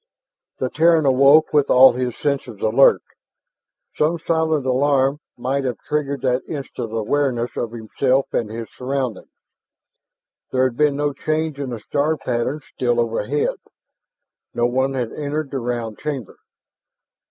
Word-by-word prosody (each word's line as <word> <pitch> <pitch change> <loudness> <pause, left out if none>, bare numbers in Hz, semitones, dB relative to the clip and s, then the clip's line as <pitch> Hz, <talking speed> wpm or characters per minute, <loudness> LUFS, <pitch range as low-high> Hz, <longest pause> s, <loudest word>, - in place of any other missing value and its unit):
The - - -2
Terran 165 -1 +4
awoke 140 +4 +5
with 145 -2 +3
all 130 0 +7
his 125 -1 -3
senses 140 -7 -2
alert; 115 +5 +4 0.9
some 160 +3 +1
silent 160 -3 0
alarm 135 +2 +2 0.2
might 135 +3 -1
have 125 -4 -2
triggered 140 -3 -1
that 125 -1 +1
instant 135 -6 -6
awareness 120 +2 -1
of 115 - -3
himself 125 +4 0
and 110 - -1
his 115 +1 -6
surroundings. 130 -4 -4 1.2
There 130 0 +2
had 130 -2 0
been 150 +1 +2
no 145 0 -1
change 155 0 -2
in 140 -2 -3
the 120 -2 -5
star 150 +8 0
pattern 130 +3 -2
still 120 -1 0
overhead; 115 +4 -1 1.0
no 120 - +2
one 130 +2 0
had 120 -3 -2
entered 150 0 -3
the 135 - -2
round 120 -3 -4
chamber. 140 -8 -5
135 Hz, 140 wpm, -21 LUFS, 120-145 Hz, 1.2 s, all